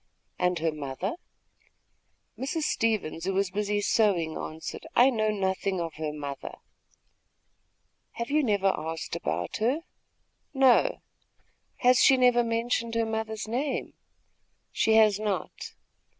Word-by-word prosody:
"And 180 Hz, 0 st, +1 dB
her 165 Hz, 0 st, 0 dB
mother?" 150 Hz, +6 st, -4 dB, 1.2 s
Mrs. 300 Hz, +5 st, -3 dB
Stevens, 215 Hz, -, -1 dB
who 190 Hz, 0 st, -1 dB
was 195 Hz, -1 st, 0 dB
busy 205 Hz, +1 st, -1 dB
sewing, 195 Hz, -7 st, +2 dB
answered: 160 Hz, -, -6 dB
"I 255 Hz, +3 st, +6 dB
know 215 Hz, -3 st, 0 dB
nothing 190 Hz, -2 st, -1 dB
of 165 Hz, -2 st, -3 dB
her 155 Hz, -1 st, -3 dB
mother." 145 Hz, -2 st, -6 dB, 1.6 s
"Have 235 Hz, +3 st, -5 dB
you 305 Hz, +1 st, +3 dB
never 200 Hz, -5 st, +2 dB
asked 160 Hz, +1 st, -5 dB
about 80 Hz, +4 st, -3 dB
her?" 250 Hz, +9 st, 0 dB, 0.7 s
"No." 265 Hz, -, +4 dB, 0.8 s
"Has 250 Hz, 0 st, +6 dB
she 265 Hz, -, +6 dB
never 245 Hz, -1 st, +4 dB
mentioned 230 Hz, 0 st, -1 dB
her 230 Hz, 0 st, +1 dB
mother's 220 Hz, -1 st, -3 dB
name?" 260 Hz, +5 st, -2 dB, 0.8 s
"She 220 Hz, -, +2 dB
has 215 Hz, -2 st, +5 dB
not." 210 Hz, -3 st, -4 dB
210 Hz, 120 wpm, -27 LUFS, 175-235 Hz, 1.6 s, I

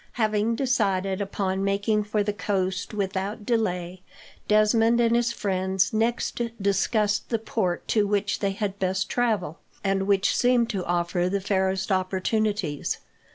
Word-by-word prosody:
Having 215 Hz, 0 st, +1 dB
decided 200 Hz, -7 st, 0 dB
upon 195 Hz, -1 st, -2 dB
making 200 Hz, +2 st, +1 dB
for 210 Hz, 0 st, 0 dB
the 205 Hz, 0 st, -1 dB
coast 190 Hz, -1 st, -2 dB
without 200 Hz, +1 st, -3 dB
delay, 180 Hz, -6 st, -1 dB, 0.5 s
Desmond 225 Hz, +2 st, +4 dB
and 235 Hz, 0 st, +3 dB
his 240 Hz, 0 st, +2 dB
friends 190 Hz, -2 st, 0 dB
next 230 Hz, +2 st, 0 dB, 0.2 s
discussed 205 Hz, +1 st, +1 dB
the 230 Hz, -, +1 dB
port 215 Hz, -5 st, -2 dB
to 210 Hz, -2 st, +2 dB
which 205 Hz, 0 st, 0 dB
they 200 Hz, -1 st, 0 dB
had 200 Hz, -1 st, -3 dB
best 190 Hz, 0 st, -1 dB
travel, 215 Hz, -10 st, 0 dB, 0.2 s
and 195 Hz, -1 st, 0 dB
which 200 Hz, 0 st, +2 dB
seemed 245 Hz, -2 st, +3 dB
to 195 Hz, -4 st, -2 dB
offer 175 Hz, +1 st, 0 dB
the 200 Hz, +1 st, 0 dB
fairest 190 Hz, 0 st, 0 dB
opportunities. 190 Hz, -3 st, 0 dB
200 Hz, 140 wpm, -25 LUFS, 190-215 Hz, 0.5 s, Desmond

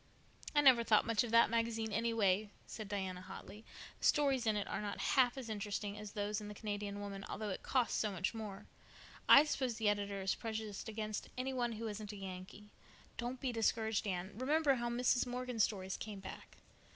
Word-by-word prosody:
"I 295 Hz, -, +6 dB
never 255 Hz, -4 st, +7 dB
thought 215 Hz, -2 st, +4 dB
much 225 Hz, -1 st, +2 dB
of 240 Hz, -, -4 dB
that 230 Hz, 0 st, +5 dB
magazine, 225 Hz, -2 st, 0 dB
anyway," 215 Hz, -2 st, +2 dB, 0.2 s
said 215 Hz, -2 st, -7 dB
Diana 190 Hz, -3 st, -3 dB
hotly. 195 Hz, +3 st, -10 dB, 0.4 s
"The -, -, -3 dB
stories 275 Hz, -5 st, +3 dB
in 215 Hz, -, +3 dB
it 205 Hz, -, -1 dB
are -, -, -3 dB
not 205 Hz, -1 st, -4 dB
half 255 Hz, -1 st, +3 dB
as 260 Hz, -3 st, -5 dB
interesting 205 Hz, -1 st, -3 dB
as 210 Hz, -1 st, -8 dB
those 210 Hz, 0 st, -2 dB
in 210 Hz, -, -7 dB
the 210 Hz, -, -7 dB
Canadian 205 Hz, -1 st, -4 dB
Woman, 200 Hz, -1 st, -6 dB
although 215 Hz, 0 st, -3 dB
it -, -, -4 dB
costs 255 Hz, -3 st, +1 dB
so 210 Hz, -, 0 dB
much 185 Hz, +2 st, -1 dB
more. 215 Hz, -3 st, -6 dB, 0.6 s
I 280 Hz, -, +11 dB
suppose 260 Hz, -5 st, -1 dB
the 220 Hz, -2 st, +2 dB
editor 200 Hz, -1 st, -1 dB
is 190 Hz, 0 st, +1 dB
prejudiced 220 Hz, -2 st, -5 dB
against 215 Hz, -1 st, -4 dB
any 260 Hz, +1 st, -2 dB
one 240 Hz, -2 st, 0 dB
who 225 Hz, +1 st, -4 dB
isn't 210 Hz, 0 st, -5 dB
a -, -, -7 dB
Yankee. 195 Hz, +2 st, -8 dB, 0.5 s
Don't 245 Hz, +2 st, -3 dB
be 260 Hz, -1 st, -1 dB
discouraged, 225 Hz, -1 st, +1 dB
Anne. 185 Hz, 0 st, -2 dB
Remember 285 Hz, +4 st, +3 dB
how 240 Hz, -2 st, -1 dB
Mrs. 245 Hz, +1 st, +2 dB
Morgan's 250 Hz, -2 st, +1 dB
stories 190 Hz, -3 st, -4 dB
came 210 Hz, -2 st, -6 dB
back. 195 Hz, -, -10 dB
215 Hz, 200 wpm, -36 LUFS, 205-240 Hz, 0.6 s, I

